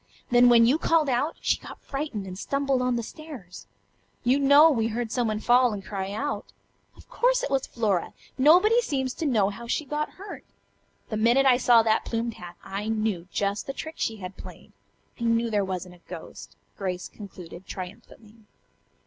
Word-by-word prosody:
Then 245 0 +6
when 230 -1 +7
you 270 +7 +3
called 325 -4 +2
out, 275 +6 0
she - - +1
got - - -11
frightened 275 -8 -4
and 185 -1 -7
stumbled 275 +5 -1
on 250 -1 +1
the 235 - -2
stairs. 250 - -10 0.6
You 260 +3 +3
know 285 +3 +7
we 225 -5 +1
heard 230 0 -3
someone 225 -4 0
fall 245 +1 +4
and 195 -2 -7
cry 195 -1 -4
out. 280 +8 -3 0.5
Of - - -17
course - - +1
it - - -3
was 270 -1 0
Flora. 210 -7 -1 0.2
Nobody 360 - +5
seems 265 - -2
to 320 - -3
know 215 -7 +2
how 235 +4 -9
she 305 - -1
got 300 +2 -3
hurt. 395 +2 -9 0.7
The 215 - -2
minute 235 +5 +4
I 255 -2 +6
saw 240 -2 +5
that 220 0 +2
plumed 230 0 -2
hat 175 -3 -10
I 200 +2 -5
knew 215 -6 -1
just 200 0 -1
the 275 - -3
trick 315 +4 -7
she 225 - -1
had 185 -2 -8
played. - - -12 0.5
I 235 - -2
knew 230 0 +1
there 205 -2 +2
wasn't 185 -1 -5
a 175 - -19
ghost," - - -9 0.2
Grace 185 -2 -3
concluded 185 -3 -11
triumphantly. 205 +4 -10
235 Hz, 185 wpm, -26 LUFS, 205-275 Hz, 0.7 s, when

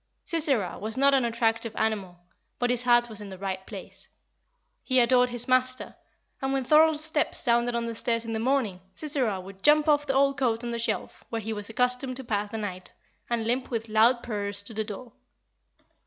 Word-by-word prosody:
Sisera 280 - 0
was 220 +3 -3
not 280 +1 +4
an 265 -3 +3
attractive 230 -1 0
animal, 200 -5 -1 0.4
but 245 0 +1
his 245 -1 0
heart 240 -1 +4
was 215 -2 -7
in 205 - -8
the 190 - -9
right 190 0 -4
place; - - -9 0.7
he 255 -1 +2
adored 250 +1 +4
his 245 -1 -4
master, 255 0 +1 0.5
and 270 0 -1
when 270 -1 0
Thorold's 310 +2 +4
step 315 -1 +1
sounded 240 -1 +2
on 235 0 -1
the 230 - -4
stairs 230 0 -1
in 225 - -4
the 220 - -1
morning, 230 -7 0
Sisera 260 - -1
would 190 +1 -11
jump 300 +4 +5
off 295 -1 +3
the 270 - 0
old 275 0 +3
coat 235 -3 0
on 240 - -3
the 235 - -3
shelf, 230 - -3
where 230 - -2
he 220 0 -4
was 205 0 -4
accustomed 250 +2 0
to 265 - -7
pass 210 -3 -2
the 225 - -5
night, 185 -4 -6 0.4
and 235 -2 0
limp 250 +3 0
with 230 -2 -3
loud 230 +3 +4
purrs 205 -3 -4
to 210 - -9
the 220 0 -1
door. 220 +3 -8
235 Hz, 205 wpm, -27 LUFS, 215-260 Hz, 0.7 s, jump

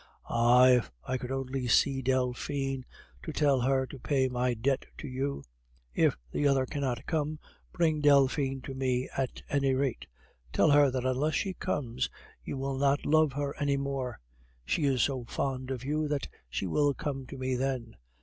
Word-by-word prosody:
Ah! 120 +2 +5
if 125 -2 +4
I 130 0 -2
could 125 - -6
only 135 -1 -2
see 135 +4 +3
Delphine, 130 +1 -1 0.4
to 160 - -5
tell 145 -4 +2
her 130 +1 +2
to 135 +1 -10
pay 135 0 +1
my 125 -1 0
debt 130 +4 0
to 150 - -7
you. 135 +2 -3 0.5
If - - +3
the 145 - +1
other 135 -2 +3
cannot 135 -4 -3
come, 155 -1 -1 0.3
bring 160 -3 +1
Delphine 140 -1 +3
to 135 - -6
me 130 -1 -1
at 135 -2 -3
any 135 -2 +1
rate. 130 - -1 0.4
Tell 110 - +4
her 145 -1 +6
that 130 -1 -2
unless 140 +4 +1
she 195 - -1
comes, 125 -7 -2 0.3
you - - -5
will 135 0 -2
not 140 +1 +2
love 155 -1 +4
her 140 0 -2
any 140 -1 +1
more. 135 -4 -3 0.5
She 150 - 0
is 130 -4 +3
so 130 -3 -1
fond 130 +1 -3
of 130 -1 -4
you 150 +2 0
that 145 -1 -2 0.2
she - - -2
will 145 - +2
come 135 -3 -4
to 140 - -8
me 130 0 -1
then. 125 -3 -2
135 Hz, 180 wpm, -30 LUFS, 130-140 Hz, 0.5 s, her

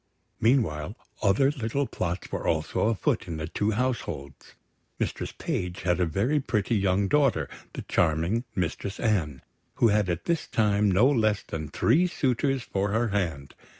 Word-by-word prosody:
Meanwhile, 105 - +1 0.3
other 110 +8 +3
little 140 0 -1
plots 90 -6 -4
were - - -3
also 80 +5 +1
afoot 110 -4 0
in 85 -2 -4
the 80 0 -4
two 105 +6 -1
households. 105 - -3 0.4
Mistress - - -3
Page 90 0 -4
had 90 -1 +1
a 90 - +2
very 115 - +1
pretty 110 -5 -1
young 100 0 +2
daughter, 125 - +2 0.4
charming 85 +8 +1
Mistress 95 +3 -3
Anne, 85 - 0 0.3
who 115 - +4
had 105 -2 +2
at 85 0 -2
this 170 -2 0
time 105 -1 +2
no 100 +6 +4
less 110 -7 +2
than 80 -2 -5
three 165 +10 +3
suitors 135 -4 0
for 100 -2 -1
her 115 +3 +1
hand. 80 -9 -2
100 Hz, 150 wpm, -27 LUFS, 85-120 Hz, 0.4 s, who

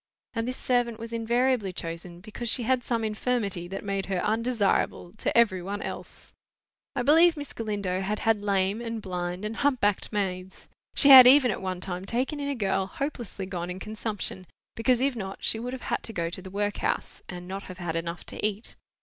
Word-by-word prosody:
And 230 0 -2
this 255 - -3
servant 245 -2 0
was 230 +1 -7
invariably 235 -2 +1
chosen 170 0 -6
because 220 +3 -4
she 240 - +3
had 255 +1 +1
some 230 -2 -1
infirmity 215 -5 -1
that 195 +2 -6
made 195 -1 -2
her 190 -1 -1
undesirable 220 -5 0
to - - 0
every 205 -6 +4
one 200 +3 -4
else. - - -8 0.6
I 245 - 0
believe 325 +4 +5
Miss 290 -1 -7
Galindo 200 -4 -2
had 210 +2 -1
had 220 -1 +1
lame 200 +1 0
and 230 -1 -4
blind 180 -1 -4
and 220 +2 -4
hump 280 -2 +2
backed 205 -1 +1
maids. 190 -3 -3 0.3
She 285 - +5
had 260 -2 +12
even 260 -2 +7
at - - -4
one 185 -1 -3
time 185 0 -5
taken 255 +8 -1
in 285 0 -2
a 280 - -1
girl 195 -4 0
hopelessly 240 -6 -5
gone 180 -2 -4
in 180 - -5
consumption, 210 -3 -4 0.3
because 245 +2 +2
if 270 -1 +1
not 195 -3 -6
she 220 - +4
would 245 +2 -4
have 260 - -7
had - - 0
to 225 - -7
go 170 -3 -2
to 185 - -6
the 190 - -9
workhouse, 205 +1 -2
and 180 -1 -7
not 195 +1 -5
have 185 - -8
had 175 -3 -4
enough 170 +1 -4
to - - -7
eat. 215 +1 -2
210 Hz, 205 wpm, -27 LUFS, 190-240 Hz, 0.6 s, had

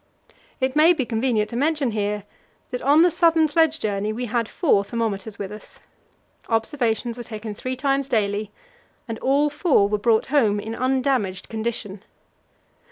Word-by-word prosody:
It 260 +1 -1
may 320 +3 +6
be 280 -7 -2
convenient 225 -2 0
to - - -5
mention 290 -1 +1
here 210 -1 -2 0.5
that 250 - -3
on 290 +5 +5
the 355 - +4
southern 330 -1 +3
sledge 320 +1 +2
journey 205 0 -1
we 240 +3 -4
had 230 -1 -1
four 275 - +2
thermometers 220 -2 -3
with 200 -1 -5
us. 210 - -11 0.7
Observations 230 0 -1
were 240 - -6
taken 215 -1 -7
three 255 +5 -4
times 275 +1 0
daily, 210 -3 0 0.6
and 225 -1 -5
all 285 +2 +2
four 290 - +3
were 210 0 -1
brought 220 +1 +2
home 215 -8 +3
in 220 +2 -5
undamaged 255 -6 -1
condition. 220 -3 -4
235 Hz, 160 wpm, -23 LUFS, 215-275 Hz, 0.7 s, may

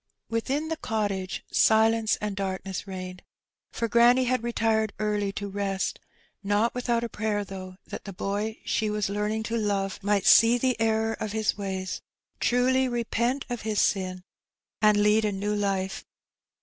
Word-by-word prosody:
Within 270 +7 -1
the 320 - -2
cottage 200 - -2
silence 220 0 +4
and 210 -1 -4
darkness 190 0 -4
reigned, 185 -1 -7 0.5
for 230 - -2
granny 240 +2 +5
had 255 0 +1
retired 225 -2 0
early 210 -2 0
to 205 0 -4
rest 195 -1 -2 0.2
— - - -39
not 220 +3 +2
without 240 -1 0
a - - -1
prayer, 210 -2 -2
though, 185 -1 -8
that - - -8
the 200 - -6
boy 205 +4 -3
she 215 -1 0
was 210 -2 -1
learning 210 +2 -1
to 230 +1 -2
love 200 -3 -1
might 205 -1 +1
see 230 +2 +7
the 255 0 +1
error 225 0 +2
of 215 -1 -4
his 220 -1 +1
ways, 190 -2 -4 0.4
truly 255 +2 +2
repent 240 +2 -1
of 245 -2 -4
his 215 -1 -1
sin, 185 -2 0 0.6
and 210 -1 +5
lead 210 +1 +4
a 210 - +1
new 205 +2 -2
Ufe. 195 -2 -1
215 Hz, 160 wpm, -27 LUFS, 195-230 Hz, 0.6 s, see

